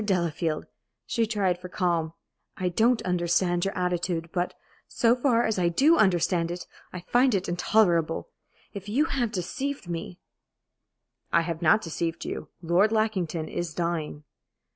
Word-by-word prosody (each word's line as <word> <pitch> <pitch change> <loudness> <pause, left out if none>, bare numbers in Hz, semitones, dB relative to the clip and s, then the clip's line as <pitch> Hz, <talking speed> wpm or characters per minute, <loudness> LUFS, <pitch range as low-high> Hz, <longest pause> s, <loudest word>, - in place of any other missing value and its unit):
Delafield" 170 -5 -1 0.4
she 230 -2 0
tried 195 -5 0
for 180 0 -9
calm 170 -3 0 0.4
"I 180 -1 0
don't 225 +6 +2
understand 175 0 +1
your 195 - -3
attitude, 175 -2 -1
but, 180 0 -1 0.3
so 235 0 +3
far 245 -2 +2
as 220 -3 0
I 175 -1 +3
do 285 - +4
understand 175 - +2
it, 175 +1 -5 0.3
I 180 - -7
find 245 +4 +3
it 190 -1 -1
intolerable. 175 - +2 0.4
If 200 -1 -7
you 275 +9 +2
have 245 -8 -1
deceived 260 +6 -4
me 170 +1 -5 0.6
" - - -53
"I - - +4
have 165 0 -4
not 175 +7 +4
deceived 165 0 -3
you. 155 - -5
Lord 180 +6 +3
Lackington 190 -8 0
is 170 -3 -4
dying." 170 -3 -2
180 Hz, 150 wpm, -26 LUFS, 170-215 Hz, 0.6 s, do